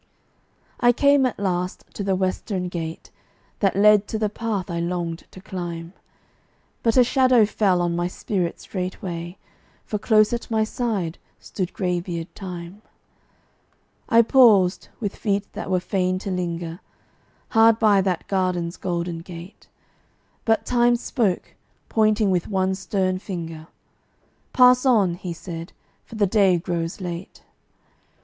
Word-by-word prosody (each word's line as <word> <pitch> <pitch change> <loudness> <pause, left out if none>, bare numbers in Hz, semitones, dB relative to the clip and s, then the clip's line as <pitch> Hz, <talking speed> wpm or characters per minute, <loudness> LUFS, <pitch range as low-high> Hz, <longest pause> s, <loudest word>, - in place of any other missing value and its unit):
I 240 -1 +5
came 280 +1 +4
at 245 - -5
last 180 -2 -2
to 200 - -4
the 195 -1 +1
western 185 0 -2
gateway, 165 -2 -6 0.5
That 195 -3 +2
led 210 0 +5
to 220 - -3
the 215 -1 -1
path 215 -5 -3
I 170 - -2
longed 170 -1 -3
to - - -13
climb; 175 -2 -6 0.9
But 230 0 +1
a 250 - +8
shadow 255 -2 +4
fell 195 -4 +1
on 170 -1 0
my 175 0 0
spirit 180 -1 -3
straightway, 180 -2 -5 0.5
For 210 - -3
close 215 +1 +3
at 235 - -4
my 220 -1 +2
side 215 -7 -2 0.2
stood 185 -3 -5
gray 180 -2 -1
beard 170 -1 -6
Time. 180 +1 -8 1.3
I 230 +1 +6
paused, 215 -7 +5
with 205 -3 -3
feet 200 -1 -1
that - - -6
were 185 -1 +2
fain 185 0 0
to 195 - -2
linger, 170 -1 -3 0.7
Hard 225 -1 +5
by 210 -4 +4
that 185 -3 -2
garden's 180 -3 -1
golden 170 -2 -3
gate, 170 +2 -11 0.8
But 225 -1 +2
Time 240 -1 +3
spoke, 230 -6 -1 0.4
pointing 215 -2 +2
with 180 -2 0
one 190 -1 0
stern 190 -1 -1
finger; 165 -5 -6 0.8
"Pass 250 0 +6
on," 215 -9 +3
he 175 +1 -6
said, 165 0 -7 0.3
"for - - -12
the 210 -2 +3
day 195 -2 +3
groes 170 0 -3
late." 175 -1 -7
190 Hz, 140 wpm, -23 LUFS, 175-215 Hz, 1.3 s, a